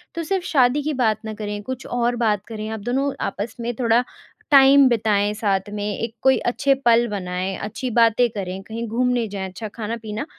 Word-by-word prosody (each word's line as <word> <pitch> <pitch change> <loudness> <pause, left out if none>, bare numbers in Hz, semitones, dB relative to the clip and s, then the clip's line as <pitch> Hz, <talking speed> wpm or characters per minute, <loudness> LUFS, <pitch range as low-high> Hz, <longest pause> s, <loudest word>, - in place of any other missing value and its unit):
तो 335 - -2
सिर्फ 380 +2 -1
शादी 270 -2 +3
की 305 +1 -1
बात 225 -5 +1
ना 220 - -4
करें 210 -1 -5
कुछ 260 +3 -6
और 240 0 0
बात 215 -4 0
करें। 215 -2 -6
आप 220 0 -4
दोनों 260 +6 -1
आपस 220 +3 -4
में 235 +1 -3
थोड़ा 235 0 +3 0.5
टाइम 275 0 +7
बिताएँ 210 -3 +1
साथ 205 -2 -1
में, 205 0 -3
एक 230 0 -4
कोई 265 0 +4
अच्छे 275 +3 +1
पल 235 0 +5
बनाएँ, 185 -2 -3
अच्छी 215 +5 -4
बातें 230 +1 +4
करें, 195 -3 -5
कहीं 230 +3 -5
घूमने 245 +1 0
जाएँ 195 -2 -5
अच्छा 215 +4 -7
खाना-पीना, 225 +1 -4
230 Hz, 190 wpm, -22 LUFS, 210-245 Hz, 0.5 s, टाइम